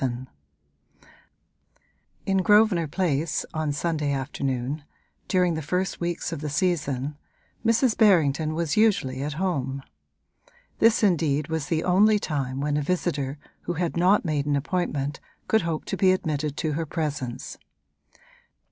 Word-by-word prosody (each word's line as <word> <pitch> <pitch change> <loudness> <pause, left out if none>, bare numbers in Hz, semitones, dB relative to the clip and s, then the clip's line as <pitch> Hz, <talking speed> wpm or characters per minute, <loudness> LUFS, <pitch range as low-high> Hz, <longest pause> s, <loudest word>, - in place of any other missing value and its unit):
VII 125 -3 0 2.1
In 195 -1 +1
Grosvenor 205 -4 +4
Place, 160 -1 -1
on 155 -2 -1
Sunday 150 -1 -1
afternoon, 135 0 -2 0.4
during 180 -2 +2
the 160 - -3
first 180 +5 -2
weeks 170 0 -2
of 165 -3 -5
the 150 - -3
season, 145 -3 -1 0.4
Mrs. 230 +1 +3
Berrington 155 -7 +3
was 165 -3 -1
usually 195 -12 +2
at 145 +1 -3
home: 140 -6 -2 1.0
this 225 0 +4
indeed 155 -6 +2
was 160 -3 -2
the 160 -1 0
only 210 +4 +4
time 135 -8 -3
when 145 0 0
a - - +1
visitor 150 -4 -1 0.3
who 175 - -1
had 175 0 -2
not 185 +4 +3
made 150 -3 -1
an 145 - +2
appointment 145 -2 -2 0.3
could 220 - +3
hope 165 -2 -3
to - - -3
be 190 -1 +5
admitted 155 -5 -1
to 155 - -1
her 160 +2 -2
presence. 145 -7 -4
155 Hz, 140 wpm, -25 LUFS, 145-180 Hz, 2.1 s, be